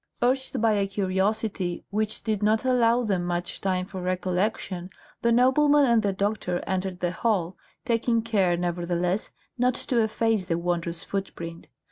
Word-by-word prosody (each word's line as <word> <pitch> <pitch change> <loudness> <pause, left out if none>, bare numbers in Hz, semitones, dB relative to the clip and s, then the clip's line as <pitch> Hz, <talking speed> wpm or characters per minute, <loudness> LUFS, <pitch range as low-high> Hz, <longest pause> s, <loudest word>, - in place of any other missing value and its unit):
Urged 260 +2 +1
by 225 0 +3
a 200 -1 +1
curiosity 195 -1 -1
which 215 +1 -1
did 215 -2 -1
not 215 +3 +2
allow 245 -1 +3
them 195 -5 0
much 175 0 -3
time 185 -1 0
for 190 -1 -7
recollection, 185 0 -1 0.3
the 235 - +2
nobleman 285 +4 +5
and 235 -3 +4
the 205 -2 +1
doctor 200 -2 -1
entered 190 -1 -2
the 175 -1 0
hall, 190 -4 0 0.3
taking 230 -1 +1
care, 195 -6 +2
nevertheless, 175 +2 -1 0.3
not 250 0 +3
to 240 -3 0
efface 220 -2 +1
the 170 -2 0
wondrous 170 -1 -2
footprint. 170 -4 -5
195 Hz, 150 wpm, -26 LUFS, 180-230 Hz, 0.3 s, nobleman